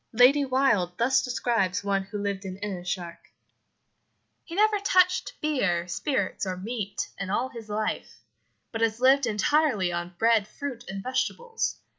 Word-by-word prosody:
Lady 255 +5 +6
Wilde 255 -10 +1
thus 260 +2 +3
describes 220 -6 0
one 200 -1 +1
who 195 +2 -7
lived 200 -1 -3
in 190 -1 -6
Innis 190 -3 -4
Sark: 175 -2 -9 1.2
"He 335 - -9
never 425 +1 +3
touched 370 -2 +2
beer, 200 - 0
spirits, 200 - -1
or 185 -2 -2
meat 205 0 -4
in 195 -1 -4
all 240 +6 0
his 230 -3 -10
life, 215 +1 -3 0.5
but 225 - -4
has 225 0 +1
lived 265 +1 +5
entirely 220 - +2
on 175 +1 -4
bread, 225 -1 +3
fruit, 250 +1 -6
and 195 0 -5
vegetables. 455 - -2
220 Hz, 150 wpm, -27 LUFS, 195-265 Hz, 1.2 s, Lady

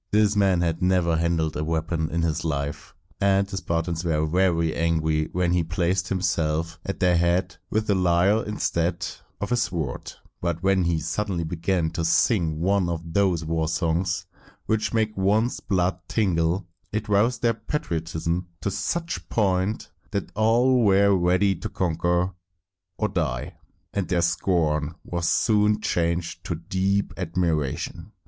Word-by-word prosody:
This 105 0 +3
man 95 -4 +3
had 85 -1 -1
never 90 -2 +2
handled 80 -1 0
a 75 - -2
weapon 80 0 -1
in 85 0 -1
his 80 -2 -1
life, 70 -2 -3 0.2
and 100 0 +3
the 100 -1 -6
Spartans 85 -1 -2
were 80 -2 +1
very 85 -1 +1
angry 80 -2 +1
when 90 -1 +1
he 90 -1 +2
placed 85 +3 0
himself 85 -3 -1
at 100 - -4
their 90 -1 +3
head 85 +1 +1
with 110 0 0
a 100 - +3
lyre 90 +3 +3
instead 85 -5 -1 0.3
of 100 - -4
a - - +4
sword; 85 - -2 0.3
but 85 0 -2
when 95 -2 +3
he 85 -1 +1
suddenly 85 +3 -2
began 85 0 -1
to 85 0 -3
sing 80 -2 +2
one 95 +1 +2
of 85 -1 -5
those 90 -5 +2
war 80 0 0
songs 85 +2 0 0.4
which 110 0 0
make 110 -2 0
one's 105 +5 +1
blood 90 -2 0
tingle, 90 -3 +1 0.3
it 105 +1 -2
roused 110 +5 +2
their 115 -1 +4
patriotism 85 - -3
to 100 - -1
such 165 - -2
a - - -11
point 100 0 0 0.2
that 100 -3 -3
all 120 +3 +3
were 100 -1 +5
ready 90 +2 +3
to 90 - -6
conquer 85 +1 0 0.6
or 110 - +1
die, 80 - -2 0.4
and 100 -3 -1
their 85 -2 +1
scorn 80 -2 +1
was 85 -1 -2
soon 105 -1 +3
changed 85 -2 -1
to 85 - -3
deep 95 +4 -1
admiration. 85 -6 -2
90 Hz, 155 wpm, -25 LUFS, 85-100 Hz, 0.6 s, were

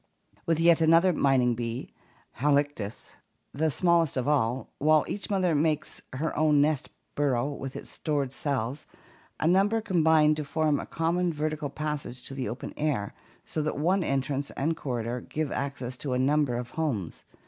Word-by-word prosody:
With 165 -1 +2
yet 165 0 +5
another 165 +3 +5
mining 130 -5 +3
bee, 115 +1 -4 0.5
Halictus, 140 -6 0 0.4
the 160 +3 +1
smallest 170 -1 +2
of 130 - -1
all, 130 -4 +1
while 155 +1 +4
each 200 - -4
mother 185 -4 +2
makes 155 0 0
her 150 +5 -2
own 150 -1 +4
nest 145 -1 +1 0.2
burrow 135 -3 +1
with 135 -2 -6
its - - -8
stored 145 -4 -2
cells, 135 -1 -3 0.5
a - - 0
number 195 +5 +3
combine 160 -6 +4
to 150 0 -3
form 150 0 +1
a - - -6
common 170 +2 0
vertical 155 -1 -2
passage 150 -5 -4
to - - -7
the 130 -5 -3
open 120 +4 -6
air, 140 -10 -1 0.3
so 155 - -3
that 155 - -2
one 180 +5 +2
entrance 135 0 -1
and 160 +4 0
corridor 125 -4 -3
give 155 +2 -3
access 130 -3 -3
to 135 0 -3
a - - +1
number 140 0 +2
of 120 0 -5
homes. 125 - -3
145 Hz, 165 wpm, -28 LUFS, 130-160 Hz, 0.5 s, yet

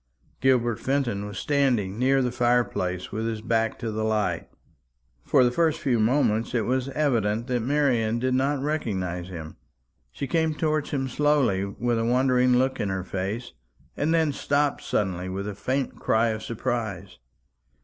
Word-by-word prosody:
Gilbert 120 -3 +2
Fenton 120 -7 -1
was 105 - -7
standing 125 -9 +1
near 135 +1 +3
the 125 - 0
fire 120 0 +3
place, 90 -4 -4
with 110 +1 -2
his 110 -1 -3
back 115 0 0
to 115 -2 -4
the 110 0 -2
light. 110 -1 0 0.8
For 130 - +4
the 120 - +3
first 160 +3 +1
few 125 -4 +1
moments 115 -1 +1
it 115 -3 +1
was 130 +2 0
evident 115 -7 0
that 125 -1 0
Marian 120 -4 +1
did 130 +2 0
not 135 +1 +1
recognize 95 - -2
him. 80 -4 -8 0.5
She 140 - -4
came 160 +2 0
towards 155 -1 0
him 135 -2 -1
slowly, 135 -8 +2
with 115 +4 -1
a - - 0
wondering 125 0 +3
look 130 +1 +1
in 100 - -1
her 95 -1 -2
face, 100 +6 -4 0.4
and 150 +3 0
then 160 -2 +3
stopped 145 0 0
suddenly 95 -3 -1
with 100 +2 -4
a 105 - -3
faint 130 +7 -2
cry 115 +1 +2
of 110 -1 -3
surprise. 110 - -4
120 Hz, 170 wpm, -25 LUFS, 105-135 Hz, 0.8 s, For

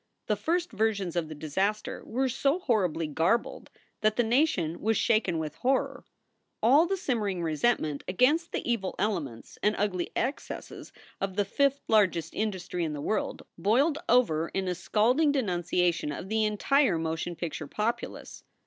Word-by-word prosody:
The 210 - +1
first 340 - -1
versions 200 -5 0
of 165 -3 -1
the 155 - -7
disaster 190 +8 -2
were 260 +4 -1
so 275 +5 +1
horribly 195 - 0
garbled 165 +10 0 0.3
that 215 0 +2
the 240 - +2
nation 225 - +1
was 220 0 +1
shaken 215 -7 +2
with 155 -2 -3
horror. 265 +1 0 0.5
All 280 +9 +5
the 390 +2 -1
simmering 210 - -1
resentment 155 -2 0
against 290 - +2
the - - -3
evil 225 -6 -1
elements 170 - -3
and 210 +1 +2
ugly 185 -4 -1
excesses 265 +4 -4 0.3
of 195 -1 -2
the 205 0 +1
"fifth 280 +7 +1
largest 185 -7 +2
industry 190 -4 -2
in 155 -2 -2
the 145 - -5
world" 215 +9 -2 0.2
boiled 270 - +2
over 170 -10 +3
in 190 -1 -1
a 180 - 0
scalding 235 - +2
denunciation 180 - 0
of 180 +6 -6
the 220 0 +2
entire 215 - +2
motion 165 +1 -3
picture 160 -2 -5
populace. 215 +9 -4
210 Hz, 155 wpm, -28 LUFS, 170-240 Hz, 0.5 s, All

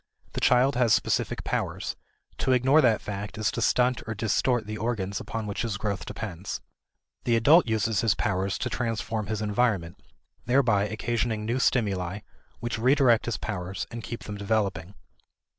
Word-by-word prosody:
The - - -3
child 125 +2 +4
has 120 -3 +5
specific - - -1
powers; - - -2 0.4
to 130 - +2
ignore 130 +5 +5
that 115 -6 +3
fact 105 +1 -5
is 110 -1 +1
to - - -3
stunt 125 0 +2
or 110 - -3
distort 110 +2 +1
the 105 +1 -5
organs 100 -3 -2
upon 115 -1 -5
which 100 -1 -3
his 115 -5 -2
growth 105 -2 -3
depends. 95 -3 -5 0.7
The 120 - +3
adult 145 +7 +6
uses 110 -1 +1
his 115 -4 +2
powers 95 0 -1
to 125 - -2
transform 115 -2 -2
his 110 -1 -2
environment, 105 -6 0 0.5
thereby 120 -6 +3
occasioning 110 0 -2
new 120 +4 0
stimuli 100 -6 0 0.4
which 115 -2 -3
redirect 125 -2 +4
his 120 - -1
powers 95 -3 -4
and 115 -1 -6
keep 115 +3 -6
them 105 -1 -6
developing. 100 -3 -1
110 Hz, 160 wpm, -27 LUFS, 100-120 Hz, 0.7 s, adult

